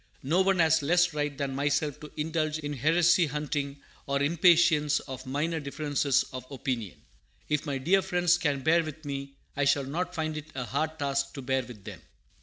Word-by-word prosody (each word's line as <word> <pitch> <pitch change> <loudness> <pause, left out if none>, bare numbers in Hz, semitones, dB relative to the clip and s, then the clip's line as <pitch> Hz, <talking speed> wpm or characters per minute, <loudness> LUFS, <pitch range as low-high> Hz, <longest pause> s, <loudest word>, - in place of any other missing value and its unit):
No 165 +8 +2
one 190 0 +2
has 160 -2 +4
less 175 +3 +3
right 145 -2 -2
than 140 -1 -2
myself 145 +1 0
to 150 - -10
indulge 155 0 -1
in 145 -1 -4
heresy 165 +5 +3
hunting 145 -1 -3 0.2
or 140 0 0
impatience 160 -1 +4
of 130 -2 -8
minor 155 +5 -1
differences 145 -1 0
of 130 -1 -5
opinion. 125 -7 -4 0.5
If 150 +1 0
my 140 -2 -1
dear 180 +9 +3
friends 180 -2 +2
can 145 -5 0
bear 165 +4 +3
with 155 0 -8
me, 140 -1 -5 0.2
I 145 - +1
shall 140 0 +3
not 175 +6 -3
find 155 -2 -2
it 155 0 -7
a 125 -2 -3
hard 155 +5 -2
task 140 -2 -1
to 135 - -6
bear 130 +1 +1
with 120 -5 -12
them. - - -9
150 Hz, 190 wpm, -28 LUFS, 140-160 Hz, 0.5 s, has